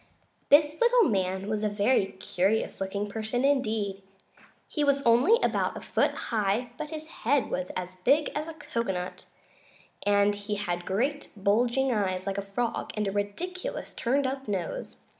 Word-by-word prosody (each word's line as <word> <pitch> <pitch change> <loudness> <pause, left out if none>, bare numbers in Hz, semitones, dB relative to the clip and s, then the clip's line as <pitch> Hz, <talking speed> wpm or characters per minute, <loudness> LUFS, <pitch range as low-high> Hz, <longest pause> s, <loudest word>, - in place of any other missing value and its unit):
This 295 +4 +5
little 480 0 +6
man 190 0 -1
was 215 0 -1
a 215 - +1
very 205 0 +2
curious 195 +3 0
looking 200 +2 -2
person 220 +5 -1
indeed. 220 -8 0 0.7
He 300 - -1
was 280 -1 +2
only 255 - +5
about - - +1
a - - -7
foot - - +2
high, 220 +2 -1
but 305 - -4
his 315 0 -6
head 265 0 +2
was 180 0 -2
as 185 0 -6
big 280 +11 +3
as 300 +2 -3
a 325 - -7
cocoanut, 195 - -3 0.8
and 205 0 +4
he 205 +1 -4
had 175 -4 -3
great, 265 +10 0
bulging 240 +7 +2
eyes, 185 -3 -1
like 195 0 -2
a 195 0 -9
frog, 240 -1 -1
and 210 -1 -1
a - - 0
ridiculous 350 - -4
turned 270 +4 +1
up 270 0 -3
nose. 190 -5 -4
215 Hz, 160 wpm, -28 LUFS, 195-275 Hz, 0.8 s, little